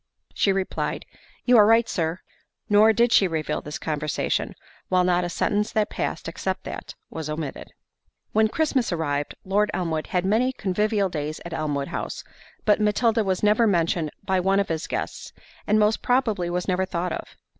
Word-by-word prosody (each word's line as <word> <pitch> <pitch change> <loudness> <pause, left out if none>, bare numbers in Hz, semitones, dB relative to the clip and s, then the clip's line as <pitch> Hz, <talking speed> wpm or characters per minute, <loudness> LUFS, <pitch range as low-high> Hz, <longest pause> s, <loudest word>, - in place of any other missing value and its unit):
She 200 - +2
replied, 190 -1 -2 0.4
"You 245 -1 +6
are 210 - +8
right, 225 +1 +5
Sir." 165 0 -2 0.5
Nor 210 +2 +6
did 235 +2 +2
she 195 - +5
reveal 160 -3 -2
this 150 - -6
conversation, 150 -1 -2 0.3
while 185 -1 +3
not 180 0 +2
a 175 - -2
sentence 205 +5 0
that 215 -1 +1
passed - - -3
except - - -3
that, - - -7 0.2
was 160 -2 -5
omitted. 150 -2 -5 0.6
When 220 0 +4
Christmas 265 -2 0
arrived, 145 -4 -2
Lord 205 +2 +2
Elmwood 160 -3 -2
had 180 0 0
many 235 +6 +2
convivial 205 -1 0
days 155 -2 -4
at 170 - -6
Elmwood 145 -3 -2
House, - - -4 0.4
but 210 0 +4
Matilda 220 +2 +2
was 190 -1 -1
never 215 +2 +4
mentioned 170 -4 +1
by 190 -1 +1
one 195 +2 +2
of 200 - 0
his 165 0 -2
guests, - - -4 0.3
and 210 - +4
most 210 +1 +2
probably 225 -8 +1
was 180 0 -2
never 185 0 +1
thought 180 -1 -2
of. - - -7
190 Hz, 175 wpm, -24 LUFS, 165-215 Hz, 0.6 s, are